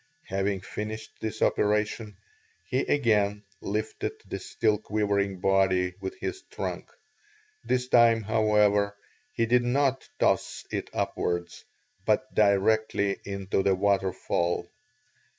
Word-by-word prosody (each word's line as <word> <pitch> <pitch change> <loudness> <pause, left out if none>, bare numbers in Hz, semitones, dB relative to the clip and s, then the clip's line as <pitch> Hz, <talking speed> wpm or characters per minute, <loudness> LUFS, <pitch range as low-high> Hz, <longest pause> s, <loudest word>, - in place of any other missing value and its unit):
Having 95 0 -1
finished 110 +3 -6
this 110 0 -2
operation, 105 0 0 0.5
he 125 +9 0
again 105 -8 +2 0.2
lifted 110 +2 -3
the - - -5
still 110 -2 0
quivering 100 -3 0
body 95 -1 +2
with 95 - -5
his 380 0 -4
trunk; - - -5 0.7
this 125 0 0
time, 115 -2 +5
however, 105 -2 +2 0.3
he 115 - 0
did 125 +2 +4
not 130 +1 +1
toss - - +1
it - - -3
upwards, 85 0 -2 0.4
but 130 +6 +1
directly 100 0 +2
into 100 -1 -1
the 95 0 +3
waterfall. 95 -3 0
105 Hz, 110 wpm, -27 LUFS, 100-110 Hz, 0.7 s, time